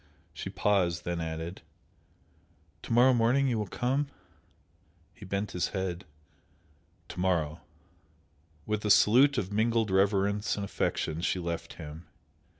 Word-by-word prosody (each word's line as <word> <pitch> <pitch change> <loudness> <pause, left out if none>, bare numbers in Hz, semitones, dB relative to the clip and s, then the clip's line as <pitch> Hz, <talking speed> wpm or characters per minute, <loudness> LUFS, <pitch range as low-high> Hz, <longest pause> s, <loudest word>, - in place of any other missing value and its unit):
She 80 +5 -6
paused 95 -4 +1
then 85 -1 -2
added 80 +2 -5 1.2
"To - - -8
morrow 125 +3 +6
morning 125 +4 +3
you 120 -4 0
will 105 - -2
come?" 135 +7 -1 1.1
He 105 - -12
bent 100 +2 -2
his 90 - -1
head. 95 0 -3 1.0
"To - - -8
morrow!" 85 -4 0 1.0
With 105 0 -2
a 105 - -1
salute 130 +7 +6
of 100 -4 -2
mingled 110 -1 +1
reverence 100 +1 +2
and 100 - -3
affection 80 -4 -2
she 90 - 0
left 85 -1 -4
him. 80 0 -10
100 Hz, 130 wpm, -29 LUFS, 85-110 Hz, 1.2 s, morrow